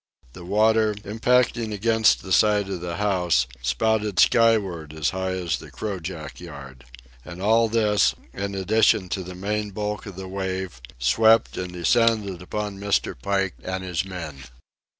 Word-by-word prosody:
The 90 - -11
water, 110 +3 +2
impacting 115 +2 +1
against 110 +2 +2
the 95 - -8
side 105 -1 +3
of 95 -3 -4
the 85 -1 -4
house, 90 -10 +1 0.2
spouted 105 - 0
skyward 100 -10 +3
as 80 -1 -1
high 95 0 -2
as 90 -5 -2
the - - -11
crojack 90 -6 -6
yard. 70 -6 -11 0.4
And 90 +3 -10
all 110 +3 +3
this, 105 -4 +2 0.2
in 100 0 -4
addition 100 -1 +2
to 95 - -2
the 90 +1 -9
main 105 +3 -2
bulk 105 +1 -4
of 100 - -8
the 95 0 -7
wave, 95 -5 -4 0.2
swept 110 - +3
and 90 -1 -4
descended 105 0 +1
upon 105 +1 -4
Mr. 100 0 0
Pike 95 +7 -1
and 95 0 -4
his 90 -2 -2
men. 80 -8 -8
95 Hz, 150 wpm, -24 LUFS, 90-105 Hz, 0.4 s, side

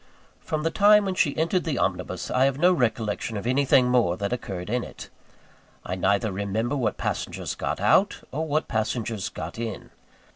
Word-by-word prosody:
From 155 -1 -3
the 165 - 0
time 210 +2 +5
when 190 - -1
she 150 -6 +1
entered 165 +3 +1
the 155 -6 -2
omnibus, - - -2
I 130 +1 +3
have 135 -1 +1
no 180 +4 +5
recollection 115 - -1
of 100 - -5
anything 130 0 +3
more 120 -8 +2
that 100 +3 -2
occurred 95 -7 -5
in 120 +3 -1
it. - - -10 0.7
I 90 - -3
neither 100 +3 +1
remember 100 +7 -2
what 120 -6 -1
passengers - - -3
got - - -3
out, - - +3
or 160 +4 -2
what 155 +1 0
passengers 110 -2 -2
got - - -7
in. 115 -3 -5
125 Hz, 180 wpm, -25 LUFS, 105-150 Hz, 0.7 s, time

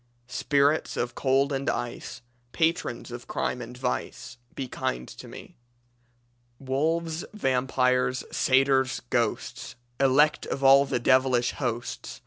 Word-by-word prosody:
"Spirits 140 +4 +1
of 120 0 -2
cold 135 +2 +1
and 135 +1 -1
ice, 120 +1 -4 0.3
Patrons 160 -7 -1
of 120 0 -8
crime 125 - -2
and 120 +1 -8
vice, 125 -1 -4 0.2
Be 135 - -4
kind 60 - -3
to - - -11
me. - - -12 1.0
"Wolves, 160 +5 -1
vampires, 130 -4 +1
satyrs, 130 -1 +2
ghosts! 120 -3 -2 0.2
Elect 140 +3 +3
of 140 - -4
all 135 +1 +7
the 135 - -1
devilish 130 0 +3
hosts! 120 -3 -4
130 Hz, 115 wpm, -26 LUFS, 125-140 Hz, 1.0 s, all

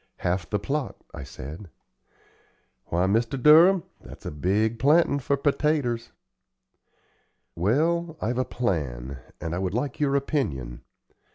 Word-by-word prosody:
"Half 90 -2 -2
the 105 - +1
plot," 140 +6 -3 0.2
I - - -7
said. 75 +7 -9 1.2
"Why, 85 +2 0
Mr. 115 +6 +1
Durham, 165 +6 +7 0.2
that's - - -13
a - - -3
big 105 +9 0
plantin' 145 +2 +4
for 140 +2 0
pertaters." 140 -4 0 1.5
"Well, 160 - +1
I've 120 +3 -1
a - - +3
plan, 70 - -3 0.2
and 85 +2 -3
would 95 +1 -2
like 130 +2 -2
your 140 -2 +1
opinion. 75 - -2
115 Hz, 120 wpm, -26 LUFS, 85-145 Hz, 1.5 s, Durham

